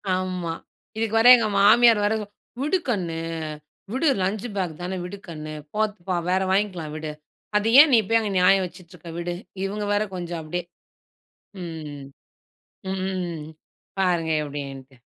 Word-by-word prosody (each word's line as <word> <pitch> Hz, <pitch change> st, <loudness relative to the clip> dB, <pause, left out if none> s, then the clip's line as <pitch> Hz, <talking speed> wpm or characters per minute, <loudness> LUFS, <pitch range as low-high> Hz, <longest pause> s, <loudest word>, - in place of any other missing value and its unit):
ஆமா 185 Hz, -3 st, -2 dB, 0.4 s
இதுக்கு 225 Hz, 0 st, -1 dB
வர 235 Hz, -, +6 dB
எங்க 225 Hz, -2 st, 0 dB
மாமியார் 225 Hz, +1 st, +6 dB
வேற, 210 Hz, -, +2 dB, 0.5 s
"விடு 305 Hz, +7 st, +2 dB
கண்ணு 175 Hz, -7 st, -1 dB, 0.7 s
விடு. 270 Hz, +6 st, +1 dB
லஞ்ச் 200 Hz, +4 st, -1 dB
பேக் 180 Hz, -4 st, -1 dB
தானே 185 Hz, +1 st, -3 dB
விடு 200 Hz, +3 st, -7 dB
கண்ணு 155 Hz, -2 st, -7 dB, 0.2 s
போட்டுபோ 205 Hz, -4 st, -1 dB
வேற 190 Hz, +1 st, +2 dB
வாங்கிக்கலாம் 185 Hz, -6 st, 0 dB
விடு. 155 Hz, -1 st, -4 dB, 0.5 s
அதை 215 Hz, +2 st, +1 dB
ஏன் 305 Hz, -3 st, +5 dB
நீ 230 Hz, -, +7 dB
போய் 225 Hz, 0 st, +5 dB
அங்க 210 Hz, -2 st, -2 dB
நியாயம் 190 Hz, +1 st, +5 dB
வச்சுட்டு 180 Hz, 0 st, -12 dB
இருக்க 170 Hz, -1 st, -10 dB
விடு." 175 Hz, 0 st, -3 dB, 0.3 s
இவுங்க 205 Hz, +2 st, -3 dB
வேற 205 Hz, +1 st, +2 dB
கொஞ்சம் 175 Hz, -2 st, -4 dB
அப்படியே. 175 Hz, +3 st, -4 dB, 1.0 s
ம். 155 Hz, -4 st, -7 dB, 0.9 s
ம். 180 Hz, -5 st, -3 dB, 0.5 s
பாருங்க 170 Hz, -3 st, +1 dB
எப்படின்ட்டு. 140 Hz, -2 st, -7 dB
180 Hz, 140 wpm, -24 LUFS, 165-205 Hz, 1.0 s, நீ